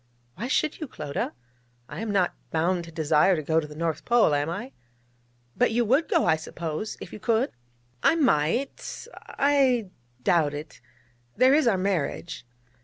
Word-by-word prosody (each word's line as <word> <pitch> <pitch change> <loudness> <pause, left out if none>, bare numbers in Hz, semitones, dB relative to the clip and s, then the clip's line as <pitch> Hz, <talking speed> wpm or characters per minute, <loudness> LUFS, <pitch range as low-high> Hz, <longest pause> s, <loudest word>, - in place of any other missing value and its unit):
'Why 235 - -5
should 305 +3 0
you, 310 - -4
Clodagh? 150 - -4 0.5
I - - -8
am 225 - -3
not 195 -4 +2 0.2
bound 170 +2 0
to 165 - -11
desire 160 +3 +3
to 155 - -3
go 160 +2 +2
to 155 - -5
the 150 - -11
North 165 0 -2
Pole, 235 -10 +4
am 145 +2 0
I?' 210 +10 -5 0.8
'But - - +3
you 235 +1 +1
would 270 +9 +2
go, 335 -7 +2
I 160 - +3
suppose, 160 +4 -5
if - - -9
you - - -7
could?' 230 +5 +1 0.5
'I - - +4
might 255 - 0
I 265 -8 +1 0.3
doubt 150 -3 +2
it. 150 -3 -9 0.6
There 260 +1 +6
is 300 -3 +4
our 210 -5 +3
marriage....' 180 -7 -2
185 Hz, 170 wpm, -26 LUFS, 160-245 Hz, 0.8 s, There